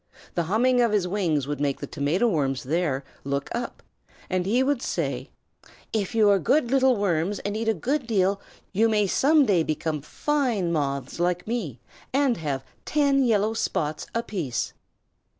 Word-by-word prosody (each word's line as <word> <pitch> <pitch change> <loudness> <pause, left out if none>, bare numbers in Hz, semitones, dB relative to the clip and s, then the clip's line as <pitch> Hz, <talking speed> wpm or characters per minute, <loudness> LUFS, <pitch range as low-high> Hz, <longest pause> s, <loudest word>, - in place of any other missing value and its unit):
The 170 - 0
humming 245 +4 +3
of 235 -3 +2
his 200 -4 +2
wings 175 -8 0
would 145 0 -4
make 140 -2 0
the - - -4
Tomato 160 +9 0
Worms 140 - 0
there 145 -2 0 0.2
look 140 0 -3
up, 240 +1 -4 0.5
and 185 0 0
he 245 +6 +3
would 275 -2 +1
say: - - -2 0.6
"If 215 0 -1
you 220 -2 +5
are 200 - +4
good 245 - +2
little 265 -1 +4
Worms 195 -1 0
and 205 +1 -3
eat 225 +1 -2
a 220 - +2
great 260 - -1
deal, 200 -2 +1 0.3
you 225 +4 +3
may 210 -2 +3
some 285 - +4
day 195 -7 +3
become 155 -1 -2
fine 235 - 0
Moths 140 -3 -2
like 180 0 0
me 210 - -3 0.3
and 270 -3 +2
have 140 -4 -3 0.2
ten 280 -2 +2
yellow 220 -2 +2
spots 160 -8 -2
apiece." 185 - -2
200 Hz, 170 wpm, -25 LUFS, 155-235 Hz, 0.6 s, you